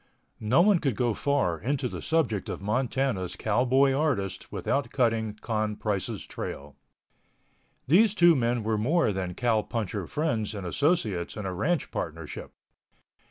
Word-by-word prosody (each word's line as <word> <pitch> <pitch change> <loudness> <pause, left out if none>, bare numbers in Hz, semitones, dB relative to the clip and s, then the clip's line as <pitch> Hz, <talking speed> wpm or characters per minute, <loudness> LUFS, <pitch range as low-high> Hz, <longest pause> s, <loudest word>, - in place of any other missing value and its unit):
No 125 +10 +4
one 200 -3 +4
could 135 -8 0
go 120 -1 +1
far 135 - 0
into 130 - -1
the - - -6
subject 130 - 0
of - - -4
Montana's 115 -2 -1
Cowboy 130 +5 +2
Artist 130 -11 -1
without 140 - -1
cutting 115 -4 0
Con 110 -1 -2
Price's 105 -3 -3
trail. 70 0 -7 1.1
These 205 - +4
two 175 -3 +6
men 120 -2 0
were 110 0 0
more 145 +1 +2
than 90 -2 -3
cowpuncher 110 -4 -1
friends 115 -9 -1
and 100 -3 -5
associates 110 - 0
in 105 - -4
a 95 - -2
ranch 150 - -1
partnership. 80 -1 -5
115 Hz, 140 wpm, -27 LUFS, 100-140 Hz, 1.1 s, two